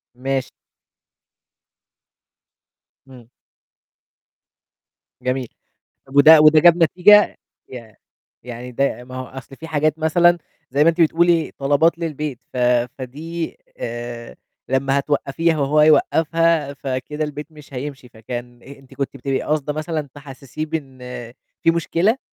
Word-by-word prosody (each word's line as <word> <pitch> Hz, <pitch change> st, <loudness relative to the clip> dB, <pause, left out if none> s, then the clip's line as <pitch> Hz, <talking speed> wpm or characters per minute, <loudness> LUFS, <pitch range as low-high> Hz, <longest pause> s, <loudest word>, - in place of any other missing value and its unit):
ماشي. 135 Hz, +1 st, -3 dB, 2.6 s
إمم. 125 Hz, -3 st, -15 dB, 1.9 s
جميل، 125 Hz, -1 st, -2 dB, 0.6 s
طب 135 Hz, +1 st, -10 dB
وده 155 Hz, +2 st, +8 dB
وده 155 Hz, 0 st, +7 dB
جاب 175 Hz, +1 st, +6 dB
نتيجة؟ 200 Hz, +5 st, +5 dB, 0.3 s
ي 115 Hz, -4 st, -10 dB, 0.5 s
يعني 125 Hz, +1 st, -8 dB
ده 130 Hz, -1 st, -1 dB
ما 130 Hz, +1 st, -11 dB
هو 130 Hz, -, -5 dB
أصل 135 Hz, +1 st, -11 dB
في 160 Hz, +3 st, -10 dB
حاجات 155 Hz, 0 st, 0 dB
مثلًا 175 Hz, +2 st, +3 dB, 0.3 s
زي 145 Hz, +3 st, +3 dB
ما 165 Hz, -, +6 dB
أنتِ 170 Hz, +1 st, -5 dB
بتقولي 165 Hz, 0 st, +3 dB
طلبات 145 Hz, +5 st, +2 dB
للبيت 150 Hz, -5 st, -4 dB
ف -, -, -8 dB, 0.4 s
فدي 160 Hz, +6 st, -6 dB, 0.2 s
آآ، 120 Hz, 0 st, -6 dB, 0.3 s
لمّا 135 Hz, +1 st, +1 dB
هتوقّفيها 150 Hz, +3 st, 0 dB
وهو 145 Hz, +2 st, +2 dB
يوقّفها، 160 Hz, -1 st, +2 dB
فكده 140 Hz, +3 st, -4 dB
البيت 150 Hz, 0 st, -6 dB
مش 150 Hz, -2 st, -15 dB
هيمشي، 135 Hz, 0 st, -7 dB
فكان 120 Hz, +2 st, -8 dB
أ -, -, -19 dB
أنتِ 135 Hz, 0 st, -18 dB
كنتِ 140 Hz, 0 st, -4 dB
بتبقي 135 Hz, +1 st, -2 dB
قصده 150 Hz, -1 st, -1 dB
مثلًا 155 Hz, -1 st, -4 dB
تحسّسيه 140 Hz, +1 st, -8 dB
بإن 140 Hz, -5 st, -6 dB, 0.6 s
في 165 Hz, -, +5 dB
مشكلة؟ 170 Hz, +7 st, +1 dB
145 Hz, 120 wpm, -20 LUFS, 130-160 Hz, 2.6 s, وده